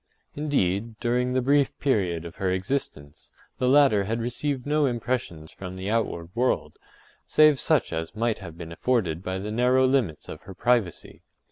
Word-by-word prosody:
Indeed, 115 Hz, -7 st, -1 dB
during 125 Hz, +1 st, 0 dB
the 130 Hz, -1 st, +1 dB
brief 140 Hz, +1 st, +2 dB
period 90 Hz, -, 0 dB
of 85 Hz, -, -9 dB
her 95 Hz, -, -1 dB
existence, 95 Hz, -, -4 dB, 0.3 s
the 125 Hz, -, +2 dB
latter 135 Hz, -8 st, +5 dB
had 115 Hz, +3 st, -2 dB
received 125 Hz, +3 st, -3 dB
no 150 Hz, 0 st, +2 dB
impressions 120 Hz, -10 st, -3 dB
from 95 Hz, -1 st, -8 dB
the 95 Hz, +3 st, -3 dB
outward 100 Hz, -7 st, -1 dB
world, 125 Hz, +2 st, -1 dB, 0.5 s
save 155 Hz, -3 st, +5 dB
such 155 Hz, -, +1 dB
as 80 Hz, +3 st, -4 dB
might 115 Hz, 0 st, 0 dB
have 85 Hz, -4 st, -10 dB
been 85 Hz, -1 st, -8 dB
afforded 90 Hz, -5 st, 0 dB
by 95 Hz, 0 st, -3 dB
the 105 Hz, +3 st, -5 dB
narrow 125 Hz, +3 st, +3 dB
limits 130 Hz, -, 0 dB
of -, -, -8 dB
her 95 Hz, -, -11 dB
privacy. 115 Hz, -8 st, -1 dB
115 Hz, 165 wpm, -25 LUFS, 95-130 Hz, 0.5 s, latter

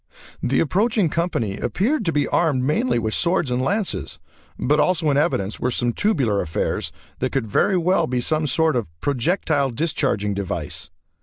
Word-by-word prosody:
The 130 Hz, -, +1 dB
approaching 200 Hz, +3 st, +1 dB
company 135 Hz, -, -1 dB
appeared 230 Hz, +4 st, 0 dB
to 165 Hz, -, +1 dB
be 145 Hz, -2 st, +1 dB
armed 150 Hz, -7 st, +1 dB
mainly 130 Hz, -3 st, +1 dB
with 110 Hz, -2 st, -1 dB
swords 170 Hz, -6 st, +1 dB
and 125 Hz, +1 st, 0 dB
lances, 200 Hz, +8 st, -2 dB, 0.4 s
but 150 Hz, +4 st, +1 dB
also 160 Hz, -2 st, +2 dB
in 140 Hz, -, +1 dB
evidence 105 Hz, -, 0 dB
were 125 Hz, -, 0 dB
some 120 Hz, -1 st, 0 dB
tubular 130 Hz, -, +1 dB
affairs 80 Hz, -2 st, -2 dB, 0.3 s
that 130 Hz, -, -1 dB
could 135 Hz, -4 st, -1 dB
very 145 Hz, -, +2 dB
well 175 Hz, -1 st, +2 dB
be 125 Hz, 0 st, -1 dB
some 155 Hz, +4 st, 0 dB
sort 160 Hz, +2 st, +2 dB
of 115 Hz, -8 st, -1 dB
projectile 145 Hz, +1 st, 0 dB
discharging 125 Hz, -6 st, -1 dB
device. 90 Hz, -6 st, -4 dB
145 Hz, 165 wpm, -22 LUFS, 120-170 Hz, 0.4 s, also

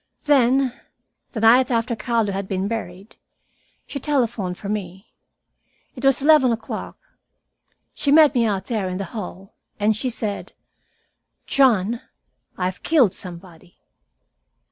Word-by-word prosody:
"Then, 265 Hz, -2 st, +3 dB, 0.6 s
the 220 Hz, -, -4 dB
night 245 Hz, +4 st, +5 dB
after 235 Hz, 0 st, 0 dB
Carlo 225 Hz, -1 st, 0 dB
had 195 Hz, 0 st, -4 dB
been 190 Hz, 0 st, -2 dB
buried, 200 Hz, -3 st, -6 dB, 0.7 s
she 280 Hz, -, -6 dB
telephoned 235 Hz, -10 st, -1 dB
for 200 Hz, -, -8 dB
me. 195 Hz, -1 st, -5 dB, 0.8 s
It 255 Hz, -, -10 dB
was 270 Hz, 0 st, +3 dB
eleven 295 Hz, -4 st, +5 dB
o'clock, 225 Hz, -1 st, -5 dB, 1.0 s
She 280 Hz, -, -1 dB
met 305 Hz, -1 st, +7 dB
me, 235 Hz, -3 st, +2 dB
out 195 Hz, -2 st, -2 dB
there 210 Hz, -6 st, -2 dB
in 185 Hz, -, -4 dB
the 195 Hz, -, -3 dB
hall, 195 Hz, -2 st, -7 dB, 0.3 s
and 210 Hz, +1 st, +2 dB
she 255 Hz, +5 st, -2 dB
said, 215 Hz, -4 st, -4 dB, 0.9 s
'John, 235 Hz, -4 st, +2 dB, 0.6 s
I 180 Hz, -, -1 dB
have 180 Hz, 0 st, -4 dB
killed 270 Hz, -, +3 dB
somebody.' 175 Hz, -1 st, -11 dB
225 Hz, 130 wpm, -22 LUFS, 195-255 Hz, 1.0 s, met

